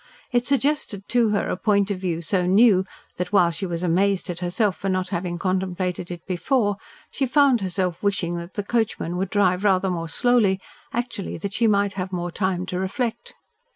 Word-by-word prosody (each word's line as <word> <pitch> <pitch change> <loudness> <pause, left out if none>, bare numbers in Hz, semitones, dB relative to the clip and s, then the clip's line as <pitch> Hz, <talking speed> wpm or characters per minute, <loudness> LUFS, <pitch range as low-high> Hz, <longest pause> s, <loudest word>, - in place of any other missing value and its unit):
It 245 0 +1
suggested 275 -7 0
to 240 -2 +3
her 205 -1 0
a - - -1
point 200 +1 +1
of 190 - -2
view 170 -3 -2
so 180 +1 0
new 195 -1 +5 0.3
that, 180 +1 -3
while 180 -4 +4
she 180 +4 -4
was 170 0 -4
amazed 185 +2 +1
at 175 - -5
herself 180 +2 0
for 195 - -3
not 185 0 -1
having 175 0 -3
contemplated 185 -1 -2
it 175 -2 -7
before, 205 +2 0 0.3
she 270 - -1
found 270 -3 +4
herself 185 -2 -2
wishing 190 -4 0
that 170 +1 -8
the 205 - -2
coachman 210 -6 -1
would 190 0 -1
drive 190 -2 +2
rather 190 -2 +3
more 165 -2 -3
slowly, 220 -2 +2 0.3
actually 235 -4 -3
that 195 +4 -5
she 230 - +2
might 200 -1 +2
have 185 -1 -4
more 175 -1 -3
time 185 -1 -1
to 180 -1 -3
reflect. 235 - -3
190 Hz, 190 wpm, -23 LUFS, 180-210 Hz, 0.3 s, new